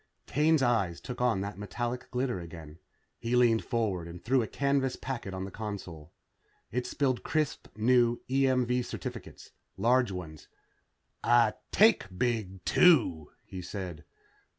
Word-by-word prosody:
Kane's 155 0 +3
eyes 100 -9 +1
took 125 -1 -7
on 120 -6 +2
that 100 0 -5
metallic 120 +5 -4
glitter 125 -4 -1
again. 80 -2 -10 0.4
He 115 +1 -1
leaned 120 -2 +4
forward 105 -8 -1
and 85 +1 -9
threw 130 +2 +3
a 110 - -2
canvas 140 -2 0
packet 120 -7 -5
on 95 0 -4
the 95 - -8
console. 90 -8 -7 0.6
It 125 +2 -2
spilled 130 -4 0
crisp 155 -2 -1
new 120 +1 +3
EMV 125 -2 +2
certificates. - - -8 0.3
Large 125 0 +3
ones. 85 -5 -8 0.8
"I - - +4 0.2
take - - +5
big, 105 -6 -2
too," 115 - +4 0.2
he 95 - -7
said. 90 -3 -6
115 Hz, 135 wpm, -30 LUFS, 95-125 Hz, 0.8 s, take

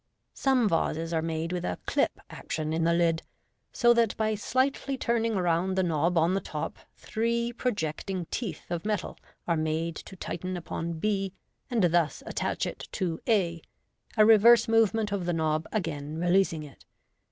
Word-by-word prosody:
Some 260 -4 +2
vases 165 -2 0
are 160 - +1
made 165 +1 -2
with 180 - -2
a 90 - -2
"clip" - - 0
action 155 0 -3
in 165 0 +1
the 170 - +3
lid, 165 -1 +2 0.5
so 240 0 +4
that 230 -2 +2
by 220 0 +1
slightly 260 +5 0
turning 230 -2 0
round 180 0 +1
the 190 - +3
knob 170 +1 +1
on 165 +3 +3
the 195 - 0
top 150 -3 -5 0.2
three 235 +1 -1
projecting 195 - -2
teeth 195 - -4
of 170 -1 -2
metal 210 -4 -2 0.3
are 170 - +2
made 160 +1 -1
to 190 - -10
tighten 180 +1 -4
upon 170 0 -4
b, 195 +2 -1 0.4
and 235 -5 +1
thus 170 -2 +2
attach - - -2
it - - -6
to 175 -5 -2
a, 175 -7 +2 0.6
a 215 - +7
reverse 225 +2 +7
movement 225 -1 +3
of 190 -3 -2
the 175 - +1
knob 160 -1 0
again 155 -7 -3
re 175 +1 0
leasing 180 -5 +2
it. 145 -2 -13
180 Hz, 170 wpm, -28 LUFS, 165-220 Hz, 0.6 s, a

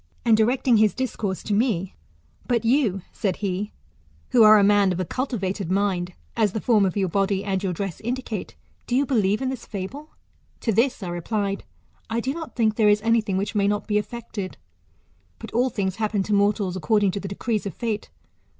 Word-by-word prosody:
And, 230 -2 +6
directing 240 +2 +3
his 215 -1 +3
discourse 215 -7 -3
to 210 - -2
me: 200 -5 0 0.5
But 235 -2 +1
you, 225 -7 +2
said 195 -5 -1
he, 200 +1 -3 0.6
who 240 - +4
are 215 0 +9
a 205 - +5
man 200 -1 +4
of 180 - -2
a 185 - -1
cultivated 200 -6 -3
mind, 185 -2 0 0.2
as 215 -4 +2
the 220 - -1
form 210 -3 +3
of 185 - -3
your 195 -2 +2
body 195 +2 0
and 195 -2 -1
your 195 -2 -1
dress 185 0 -4
indicate, 240 -3 -4 0.3
do 245 - 0
you 280 +2 +3
believe 215 -4 +1
in 260 - 0
this 260 -3 -6
fable? 240 +10 -6 0.5
To 230 - +1
this 235 0 +1
I 180 - -4
replied, 200 +3 -2 0.4
I 225 - 0
do 260 +3 -1
not 325 0 -7
think 220 -3 +1
there 215 -2 +5
is 210 +1 +3
anything 225 -4 +2
which 200 +3 -2
may 200 -2 +2
not 205 0 0
be 210 -1 +2
effected; 215 -3 -6 0.8
but - - -9
all 250 +3 +2
things 190 -5 -2
happen 215 -2 0
to 210 - -2
mortals 200 -2 +2
according 200 +3 +2
to 200 - -3
the 195 - -6
decrees 210 +2 -2
of 190 - -6
Fate. 220 -3 -3
210 Hz, 200 wpm, -24 LUFS, 195-230 Hz, 0.8 s, are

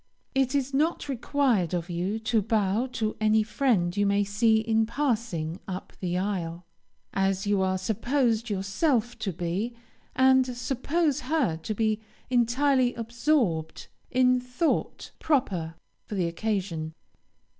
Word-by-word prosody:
It 270 0 +1
is 275 -1 0
not 310 +4 +1
required 250 - +1
of 170 -1 -3
you 180 +4 -2
to 220 0 +1
bow 215 +2 +1
to 220 -2 -1
any 215 0 +4
friend 210 -6 +1
you 205 0 +2
may 200 +1 +3
see 220 +3 +3
in 220 0 +1
passing 225 - -1
up 185 -1 -6
the 180 -1 -1
aisle, 180 -3 -3 0.5
as 195 +1 0
you 200 -1 +2
are 190 0 +1
supposed 230 +3 0
yourself 220 - 0
to 210 -3 -2
be, 180 +7 -3 0.4
and 260 -1 +4
suppose 280 +4 0
her 270 - 0
to 210 +6 -4
be 220 0 0 0.3
entirely 250 +1 +3
absorbed 235 - 0 0.2
in 255 0 +3
thought 250 +6 -2
proper 190 - 0 0.3
for 210 - -5
the 185 -3 +1
occasion. 170 -3 -2
220 Hz, 135 wpm, -27 LUFS, 190-255 Hz, 0.5 s, any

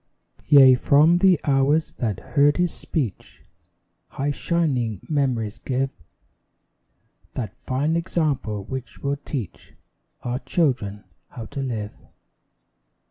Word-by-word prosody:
Yea, 135 -3 +8
from 150 +7 +4
the 185 -4 +5
hours 145 +3 +2
that 110 -6 -3
heard 145 +1 +4
his 175 -2 +1
speech 125 - -5 0.6
High 140 +2 -2
shining 135 - -1
mem'ries 125 -8 -1
give 135 +1 -1 1.4
That 115 -4 -4
fine 145 +5 -1
example 150 - -1
which 130 +4 -7
will 140 0 0
teach 135 - -7 0.5
Our 125 +1 -2
children 120 - -1 0.3
how 115 - -8
to 140 - -3
live. 110 -6 -3
135 Hz, 105 wpm, -23 LUFS, 120-150 Hz, 1.4 s, Yea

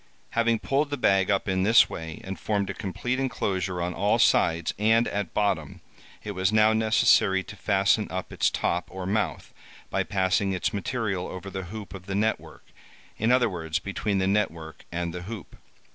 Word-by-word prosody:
Having 115 0 +2
pulled 145 +2 0
the 145 - -2
bag 95 -5 +3
up 100 0 +1
in 95 -1 +1
this 110 +4 +6
way, 80 -1 -7
and 95 0 -6
formed 100 -2 -1
a - - -6
complete 125 +7 -3
enclosure 95 -8 -1
on 90 +1 -2
all 100 +3 +2
sides, 80 0 +3
and 110 +2 +3
at 105 0 -3
bottom, 100 -8 0 0.4
it 105 - -4
was 95 0 0
now 110 0 +5
necessary 110 -3 +3
to 105 - -10
fasten 100 +2 +2
up 95 0 -5
its - - +2
top 90 +1 -1
or 95 -1 -6
mouth, 105 +3 -2 0.4
by - - +1
passing 95 0 +1
its 95 +4 -1
material 100 -3 -2
over 95 +1 -7
the 95 -1 -5
hoop 105 +3 -8
of 95 -1 -10
the 95 - -3
net 110 +2 +1
work—in 110 +3 -6
other 125 -1 +4
words, 80 -5 -3
between 100 +2 -2
the 95 - +1
net 100 +2 +2
work 80 -1 -11
and 85 0 -3
the 90 - -5
hoop. 100 +2 -8
100 Hz, 190 wpm, -26 LUFS, 95-110 Hz, 0.4 s, this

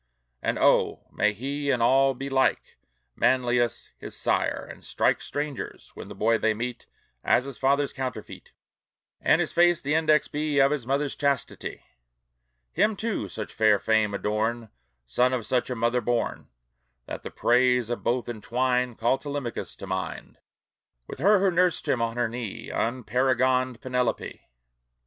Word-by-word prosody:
And - - -1
oh! - - +2
may 105 - +2
he 140 +6 -3
in 130 -3 +2
all 135 +3 +4
be 135 +2 -5
like 135 -1 0 0.4
Manlius 120 -2 +1
his - - -7
sire, - - 0
and - - -11
strike - - +1
Strangers, 145 -2 -5
when - - -9
the - - -9
boy 115 +1 +2
they 110 0 +1
meet, 120 +2 -5 0.4
As 125 - +3
his 140 -2 -8
father's 140 +1 +2
counterfeit, 130 -2 -6 0.7
And - - +4
his - - 0
face 175 0 +4
the 145 -2 -2
index 155 -2 +3
be 150 0 -2
Of 135 0 +5
his 140 -6 -2
mother's 140 +1 0
chastity! 140 -3 -2 0.9
Him, 210 +5 +2
too, 220 +2 -3
such 110 - -6
fair 110 -2 +4
fame 110 0 +1
adorn, 110 +3 -1 0.4
Son 125 - +2
of 120 -4 -2
such 125 0 0
a 125 - -2
mother 120 +2 +1
born, 120 -1 -2 0.6
That - - -6
the - - -7
praise 125 -1 +2
of 120 - -3
both 120 0 0
entwined 125 +2 -1
Call 120 +3 +1
Telemachus 140 -4 -5
to - - -9
mind, 95 -1 -5 0.7
With - - -9
her 205 +7 +5
who 195 0 +2
nursed 180 -1 +1
him 120 - +1
on 115 0 -1
her 120 -1 +1
knee, 115 -2 -6
Unparagoned 130 +1 +1
Penelope! 125 -2 -2
125 Hz, 155 wpm, -26 LUFS, 115-140 Hz, 0.9 s, Of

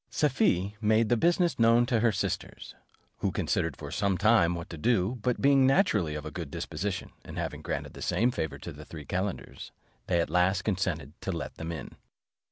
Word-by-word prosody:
Safie 105 - +1
made 110 +1 +3
the 120 - +4
business 175 +5 +2
known 115 +1 +5
to 120 -2 +1
her 115 0 +3
sisters, 95 - -4 0.5
who - - 0
considered - - -1
for - - -8
some 100 -2 +1
time 100 -4 +4
what 85 -1 -6
to - - -5
do: 115 +4 +1
but 125 +1 0
being 135 -1 +5
naturally 105 - +2
of 75 -1 -5
a 80 - -5
good 80 -1 -6
disposition, 95 +7 -4
and - - -9
having - - -3
granted - - -4
the - - -10
same 120 +3 +2
favour 80 -8 -3
to - - -8
the - - -10
three 75 -3 -9
calenders, 95 +1 -4 0.4
they 85 -2 +2
at 85 - -1
last 90 +1 +2
consented 90 -8 -1
to 95 - -2
let 80 -6 -4
them 80 +1 -6
in. 80 - -6
100 Hz, 195 wpm, -29 LUFS, 85-120 Hz, 0.5 s, known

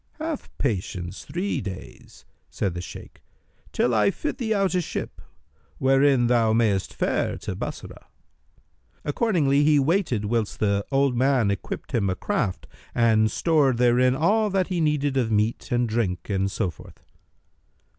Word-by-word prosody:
"Have 315 -2 -5
patience 95 -6 -3
three 175 0 -2
days," 95 -3 -10 0.2
said 95 -4 -2
the 90 - -5
Shaykh, - - -11 0.5
"till 125 - +1
I 105 -2 +4
fit 260 - -4
thee 225 -3 -2
out 195 -3 +1
a 180 - +2
ship, - - -6 0.6
wherein 135 -1 +3
thou 115 -2 +3
mayst 110 -4 +1
fare - - -1
to - - -5
Bassorah." - - -7 1.0
Accordingly 145 -5 +2
he 150 0 +4
waited 145 - +1
whilst 110 0 -1
the 100 -1 +1
old 135 -2 +2
man 125 -4 +2
equipped 100 - -5
him 100 -5 +1
a 95 - -1
craft 95 0 -2 0.3
and 110 -2 +3
stored 145 -1 +2
therein 125 +1 +3
all 210 +9 +2
that 190 -1 0
he 180 -3 -1
needed 145 -3 +1
of 120 -4 0
meat 110 +2 0
and 120 0 +2
drink 110 -4 -2
and 95 0 0
so 95 -2 -2
forth. - - -16
125 Hz, 150 wpm, -24 LUFS, 105-150 Hz, 1.0 s, I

